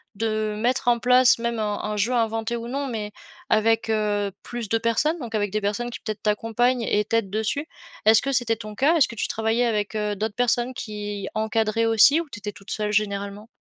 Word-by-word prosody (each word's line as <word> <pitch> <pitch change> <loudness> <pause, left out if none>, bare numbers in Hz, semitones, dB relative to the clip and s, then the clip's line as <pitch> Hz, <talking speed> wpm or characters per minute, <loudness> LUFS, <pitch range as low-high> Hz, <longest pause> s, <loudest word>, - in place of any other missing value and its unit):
de 215 0 -1
mettre 245 +2 +1
en 235 -1 +3
place, 250 0 +5
même 235 0 -2
un 210 -1 -1
un 210 0 -2
jeu 215 +5 +1
inventé 225 0 0
ou 235 0 -6
non. 275 +2 -3
Mais 210 -3 -4 0.4
avec, 225 +1 +2
heu, 205 -2 0
plus 240 -3 -5
de 225 - +2
personnes 230 +9 +1
donc 235 -5 -7
avec 205 -2 0
des 215 +1 -1
personnes 210 +4 -2
qui, - - -7
peut-être 215 -2 -5
t'accompagnent 225 +4 +1
et 210 -1 +1
t'aident 225 -3 0
dessus. 220 +8 -1 0.4
Est-ce 220 +1 +6
que 275 - -2
c'était 235 -3 +1
ton 215 -1 -8
cas? 290 +9 +3
Est-ce 290 - +5
que 235 - -9
tu - - -1
travaillais 225 +2 +1
avec, 210 -2 -1
heu, 210 -1 -1
d'autres 210 0 -3
personnes 245 +1 +1
qui 205 -3 -5
encadraient 220 +1 0
aussi? 225 +7 +6
Ou 335 - -9
tu 205 - -7
étais 205 0 -5
toute 195 0 -15
seule, 210 -1 -1
généralement? 200 0 -2
220 Hz, 215 wpm, -24 LUFS, 210-240 Hz, 0.4 s, Est-ce